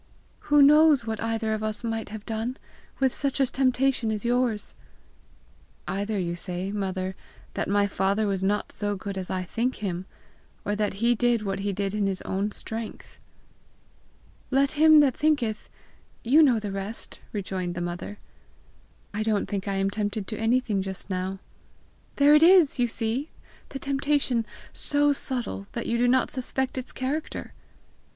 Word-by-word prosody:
"Who 295 Hz, -1 st, +7 dB
knows 300 Hz, -3 st, +6 dB
what 220 Hz, -1 st, -3 dB
either 225 Hz, -1 st, -1 dB
of 215 Hz, -, -2 dB
us 215 Hz, +1 st, -3 dB
might 225 Hz, -2 st, -3 dB
have 215 Hz, 0 st, -8 dB
done, 225 Hz, +3 st, -3 dB, 0.4 s
with 265 Hz, -2 st, +2 dB
such 280 Hz, -1 st, -1 dB
a 270 Hz, -, +5 dB
temptation 260 Hz, -2 st, +1 dB
as 215 Hz, +1 st, -3 dB
yours!" 240 Hz, -3 st, 0 dB, 1.1 s
"Either 205 Hz, +2 st, -2 dB
you 175 Hz, -2 st, -2 dB
say, 180 Hz, +2 st, -4 dB
mother, 190 Hz, -2 st, -3 dB, 0.4 s
that -, -, -2 dB
my 205 Hz, 0 st, +3 dB
father 200 Hz, +2 st, 0 dB
was 195 Hz, -2 st, -1 dB
not 205 Hz, +2 st, 0 dB
so 205 Hz, -1 st, -2 dB
good 200 Hz, 0 st, -5 dB
as 190 Hz, -1 st, -5 dB
I 185 Hz, -1 st, -1 dB
think 235 Hz, +8 st, -1 dB
him, 185 Hz, -2 st, -4 dB, 0.6 s
or 205 Hz, -, 0 dB
that 210 Hz, -1 st, -1 dB
he 240 Hz, -, +5 dB
did 240 Hz, -1 st, +1 dB
what 195 Hz, -1 st, -2 dB
he 200 Hz, +1 st, -1 dB
did 200 Hz, 0 st, -2 dB
in 210 Hz, -1 st, +1 dB
his 190 Hz, -1 st, -3 dB
own 200 Hz, +2 st, -1 dB
strength!" 225 Hz, +1 st, -7 dB, 0.6 s
"' -, -, -33 dB
Let 280 Hz, 0 st, +3 dB
him 310 Hz, 0 st, +7 dB
that 270 Hz, -4 st, +3 dB
thinketh 255 Hz, -8 st, 0 dB, 0.3 s
' -, -, -34 dB
you 315 Hz, -, +9 dB
know 265 Hz, -6 st, +5 dB
the 210 Hz, -2 st, -5 dB
rest!" 195 Hz, +3 st, -6 dB
rejoined 185 Hz, -3 st, -3 dB
the -, -, -3 dB
mother. 175 Hz, +4 st, -5 dB, 1.0 s
"I 210 Hz, -, -2 dB
don't 215 Hz, -2 st, +1 dB
think 200 Hz, -1 st, -4 dB
I 200 Hz, -, 0 dB
am 195 Hz, 0 st, +1 dB
tempted 205 Hz, -1 st, -2 dB
to 220 Hz, -, -3 dB
anything 225 Hz, -3 st, +1 dB
just 190 Hz, +1 st, -5 dB
now." 185 Hz, +1 st, -2 dB, 0.8 s
"There 285 Hz, +1 st, +6 dB
it 300 Hz, -, +7 dB
is, 335 Hz, -5 st, +6 dB
you 245 Hz, -, +3 dB
see! 235 Hz, +6 st, -2 dB, 0.4 s
the 275 Hz, -, -5 dB
temptation 270 Hz, -4 st, 0 dB, 0.3 s
so 290 Hz, 0 st, +2 dB
subtle 245 Hz, -7 st, -3 dB
that 235 Hz, -, -3 dB
you 235 Hz, 0 st, 0 dB
do 245 Hz, -, +3 dB
not 255 Hz, +1 st, +3 dB
suspect 260 Hz, 0 st, -2 dB
its 255 Hz, -1 st, -5 dB
character!" 285 Hz, +5 st, -4 dB
220 Hz, 170 wpm, -26 LUFS, 200-260 Hz, 1.1 s, you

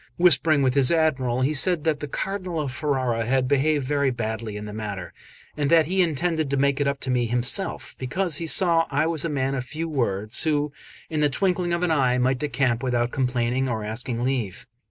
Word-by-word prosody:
Whispering 155 Hz, -4 st, +4 dB
with 130 Hz, -1 st, +2 dB
his 135 Hz, 0 st, +3 dB
Admiral, 130 Hz, -7 st, +1 dB
he 140 Hz, +4 st, +1 dB
said 165 Hz, +2 st, +2 dB
that 155 Hz, -3 st, 0 dB
the 150 Hz, -, -5 dB
Cardinal 185 Hz, +2 st, -4 dB
of 145 Hz, -4 st, -3 dB
Ferrara 130 Hz, -4 st, -1 dB
had 130 Hz, 0 st, +1 dB
behaved 145 Hz, +1 st, +1 dB
very 140 Hz, 0 st, +1 dB
badly 110 Hz, -3 st, -4 dB
in 105 Hz, -, -7 dB
the 105 Hz, -, -7 dB
matter; 105 Hz, -4 st, -6 dB, 0.4 s
and 145 Hz, -2 st, -1 dB
that 165 Hz, -1 st, +5 dB
he 185 Hz, +4 st, +1 dB
intended 160 Hz, -2 st, 0 dB
to 140 Hz, -, 0 dB
make 140 Hz, +1 st, +1 dB
it 140 Hz, -, +1 dB
up 140 Hz, 0 st, -1 dB
to 130 Hz, -, -2 dB
me 120 Hz, -2 st, +1 dB
himself, 125 Hz, -, -1 dB
because 155 Hz, +5 st, -1 dB
he 165 Hz, -, -3 dB
saw 165 Hz, -1 st, +4 dB
I 145 Hz, +2 st, +1 dB
was 160 Hz, -3 st, 0 dB
a -, -, -1 dB
man 135 Hz, -2 st, -1 dB
of 130 Hz, -2 st, -2 dB
few 155 Hz, +6 st, -5 dB
words, 110 Hz, -8 st, 0 dB
who 150 Hz, -2 st, 0 dB, 0.4 s
in 155 Hz, -, -1 dB
the 150 Hz, -1 st, +3 dB
twinkling 180 Hz, +3 st, 0 dB
of 170 Hz, +1 st, -1 dB
an 175 Hz, -, +1 dB
eye 130 Hz, -5 st, +2 dB
might 130 Hz, +1 st, +1 dB
decamp 135 Hz, -5 st, 0 dB
without 120 Hz, -2 st, 0 dB
complaining 125 Hz, 0 st, 0 dB
or 110 Hz, -3 st, -2 dB
asking 115 Hz, +2 st, -4 dB
leave. 125 Hz, -7 st, -2 dB
140 Hz, 215 wpm, -24 LUFS, 125-155 Hz, 0.4 s, that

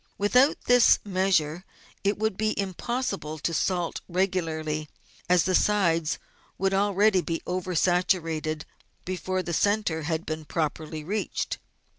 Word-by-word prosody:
With 205 Hz, +4 st, -1 dB
out 270 Hz, +4 st, +6 dB
this 245 Hz, -1 st, +6 dB
measure 185 Hz, -4 st, +1 dB, 0.4 s
it 200 Hz, +1 st, +1 dB
would 220 Hz, -1 st, 0 dB
be 215 Hz, +1 st, -1 dB
impossible 195 Hz, -, -3 dB
to 165 Hz, +3 st, -2 dB
salt 175 Hz, 0 st, -1 dB
regularly, 160 Hz, -5 st, -1 dB, 0.4 s
as 180 Hz, -2 st, +5 dB
the 185 Hz, -, 0 dB
sides 170 Hz, -6 st, +2 dB, 0.4 s
would 195 Hz, +1 st, +1 dB
already 200 Hz, 0 st, +3 dB
be 165 Hz, -1 st, -3 dB
over 180 Hz, 0 st, -3 dB
saturated 165 Hz, -3 st, +1 dB, 0.4 s
before 185 Hz, 0 st, -2 dB
the 170 Hz, -, -4 dB
centre 205 Hz, -2 st, +1 dB
had 160 Hz, +1 st, -1 dB
even 155 Hz, -2 st, -4 dB
been 155 Hz, -, -13 dB
properly 155 Hz, 0 st, -3 dB
reached. 205 Hz, +6 st, -2 dB
180 Hz, 135 wpm, -26 LUFS, 160-200 Hz, 0.4 s, out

